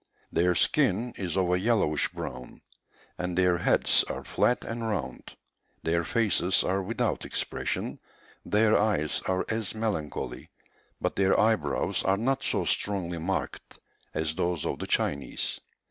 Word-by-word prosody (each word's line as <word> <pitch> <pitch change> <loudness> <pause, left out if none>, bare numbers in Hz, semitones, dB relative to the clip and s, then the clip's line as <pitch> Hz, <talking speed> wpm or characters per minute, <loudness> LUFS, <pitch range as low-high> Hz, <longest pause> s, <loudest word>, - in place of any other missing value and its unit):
Their 90 +1 +2
skin 120 - +2
is 90 -2 -3
of 90 -2 +2
a 90 - +3
yellowish 100 -8 +2
brown, 65 0 -7 0.6
and 90 -1 -2
their 90 -2 +3
heads - - +4
are - - -5
flat 125 - +1
and 115 +1 -4
round; 70 - -4 0.5
their 85 +1 +1
faces 95 -2 +2
are 95 +1 0
without 105 +5 -1
expression, - - -2 0.4
their 105 +1 +3
eyes 100 -8 +1
are 95 0 +1
as 110 -4 -2
melancholy, 105 -9 -3 0.5
but - - -1
their 95 0 +3
eyebrows 110 0 +2
are 95 0 +2
not 130 +5 0
so - - 0
strongly 90 -4 -1
marked 95 +4 -3 0.4
as 80 0 0
those 85 -1 -1
of - - -2
the - - -4
Chinese. 70 -1 -1
95 Hz, 140 wpm, -28 LUFS, 85-110 Hz, 0.6 s, heads